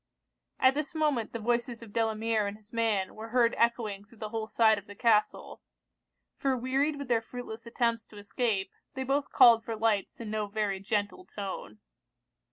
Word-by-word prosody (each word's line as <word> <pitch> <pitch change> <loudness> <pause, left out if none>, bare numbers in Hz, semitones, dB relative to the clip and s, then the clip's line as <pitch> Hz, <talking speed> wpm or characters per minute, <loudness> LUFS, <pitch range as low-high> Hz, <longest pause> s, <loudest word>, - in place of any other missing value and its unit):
At 260 0 +5
this 300 +3 -3
moment 295 -8 0
the - - -4
voices 235 +1 -1
of 215 -3 -13
Delamere 225 -1 +1
and 200 +1 -5
his 215 +1 -20
man 220 -5 +1
were 220 +1 -8
heard 235 -1 +3
echoing 225 -4 0
through 220 +3 -20
the 215 0 -5
whole 220 0 -3
side 220 -1 +4
of 205 - -18
the 205 - -10
castle; 210 0 +1 0.8
for 270 -2 +1
wearied 270 +5 0
with 280 -1 -6
their 235 -2 +2
fruitless 230 0 -8
attempts 230 -1 0
to 210 - -15
escape, 205 -2 -1 0.2
they 265 - -2
both 275 +2 0
called 235 -3 +7
for 225 -1 -4
lights 215 -3 0
in 225 -2 -6
no 215 -1 -1
very 205 -2 -1
gentle 205 - -2
tone. 190 - -7
225 Hz, 180 wpm, -29 LUFS, 210-240 Hz, 0.8 s, called